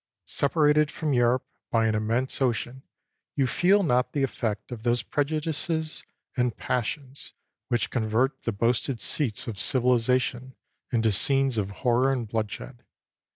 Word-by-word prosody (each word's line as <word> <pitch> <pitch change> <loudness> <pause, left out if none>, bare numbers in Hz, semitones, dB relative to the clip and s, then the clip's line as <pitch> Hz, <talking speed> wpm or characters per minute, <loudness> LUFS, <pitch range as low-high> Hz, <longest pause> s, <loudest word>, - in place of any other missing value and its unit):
Separated 150 +1 +2
from 155 -3 -2
Europe 120 +1 +2 0.2
by 115 -1 +2
an 110 - +1
immense 115 +6 -1
ocean, 125 +1 -1 0.5
you 140 - +2
feel 190 +9 +3
not 125 -5 +1
the 140 - 0
effect 115 -4 -3
of 120 -3 -6
those 120 +1 0
prejudices 155 +2 -2 0.3
and 125 -4 0
passions 130 +3 -4 0.3
which 120 -2 -1
convert 120 +3 0
the 115 - -2
boasted 115 +3 0
seats 120 -6 +1
of 105 -4 -5
civili 125 +4 +3
zation 125 +1 -1 0.4
into 115 -3 +2
scenes 135 +5 +3
of 100 -3 -1 0.2
horror 125 +2 +3
and 125 -4 -2
bloodshed. 110 +3 -5
125 Hz, 140 wpm, -26 LUFS, 115-140 Hz, 0.5 s, feel